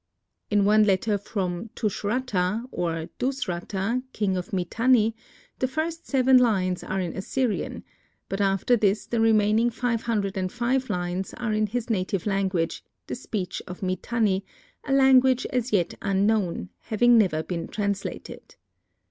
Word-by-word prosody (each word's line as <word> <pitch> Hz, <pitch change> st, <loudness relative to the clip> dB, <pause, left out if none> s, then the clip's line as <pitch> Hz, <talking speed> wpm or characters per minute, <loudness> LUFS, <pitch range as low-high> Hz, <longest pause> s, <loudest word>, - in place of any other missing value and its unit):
In 205 Hz, -1 st, +3 dB
one 215 Hz, +1 st, +5 dB
letter 205 Hz, +1 st, +2 dB
from 190 Hz, 0 st, -3 dB
Tushratta, 215 Hz, -1 st, -1 dB
or 165 Hz, -1 st, -2 dB
Dusratta, 225 Hz, -2 st, -2 dB
king 200 Hz, -3 st, 0 dB
of 180 Hz, -1 st, -4 dB
Mitanni, 225 Hz, +5 st, +2 dB, 0.4 s
the 255 Hz, -, +1 dB
first 320 Hz, +5 st, -3 dB
seven 260 Hz, -1 st, +5 dB
lines 185 Hz, -7 st, +1 dB
are 190 Hz, -, -2 dB
in 180 Hz, -3 st, -3 dB
Assyrian, 230 Hz, +4 st, -2 dB, 0.4 s
but 195 Hz, +1 st, -3 dB
after 195 Hz, +5 st, +3 dB
this 210 Hz, -2 st, +1 dB
the 235 Hz, -1 st, -1 dB
remaining 220 Hz, +1 st, +4 dB
five 235 Hz, -1 st, -1 dB
hundred 210 Hz, -4 st, -1 dB
and 185 Hz, -1 st, -1 dB
five 255 Hz, +2 st, 0 dB
lines 180 Hz, +1 st, -3 dB
are 235 Hz, -3 st, -2 dB
in 215 Hz, 0 st, +1 dB
his 235 Hz, +2 st, -3 dB
native 185 Hz, -2 st, -1 dB
language, 190 Hz, -4 st, -1 dB, 0.2 s
the -, -, -5 dB
speech 210 Hz, -7 st, -4 dB
of 180 Hz, +2 st, -8 dB
Mitanni, 195 Hz, +1 st, 0 dB, 0.4 s
a -, -, -2 dB
language 265 Hz, -1 st, +5 dB
as 250 Hz, 0 st, 0 dB
yet 185 Hz, -5 st, +1 dB
unknown, 195 Hz, -, +1 dB
having 240 Hz, +2 st, +3 dB
never 160 Hz, -7 st, +2 dB
been 170 Hz, -1 st, -4 dB
translated. 200 Hz, -1 st, -4 dB
210 Hz, 140 wpm, -25 LUFS, 190-240 Hz, 0.4 s, one